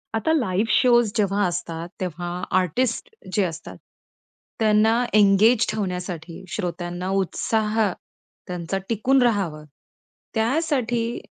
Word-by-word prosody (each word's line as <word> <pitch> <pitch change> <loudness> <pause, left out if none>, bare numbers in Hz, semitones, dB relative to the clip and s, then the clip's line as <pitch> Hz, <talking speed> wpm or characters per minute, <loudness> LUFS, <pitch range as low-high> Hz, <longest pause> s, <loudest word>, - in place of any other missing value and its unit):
आता 225 +8 +1
live 220 - +1
shows 240 -3 +4
जेव्हा 205 -2 +1
असतात, 170 -1 -4
तेव्हा 175 -1 -4 0.3
आर्टिस्ट 230 - -1 0.2
जे 205 - +2
असतात, 165 -3 -5 0.8
त्यांना 220 +2 +3
एन्गेज 210 +3 +5
ठेवण्यासाठी, 180 -4 -4
श्रोत्यांना 175 -1 -4
उत्साह 220 +3 -1 0.7
त्यांचा 180 +1 -3
टिकून 255 +4 +2
राहावं, 190 -10 0 0.7
त्यासाठी 240 -2 0
210 Hz, 95 wpm, -23 LUFS, 180-230 Hz, 0.8 s, एन्गेज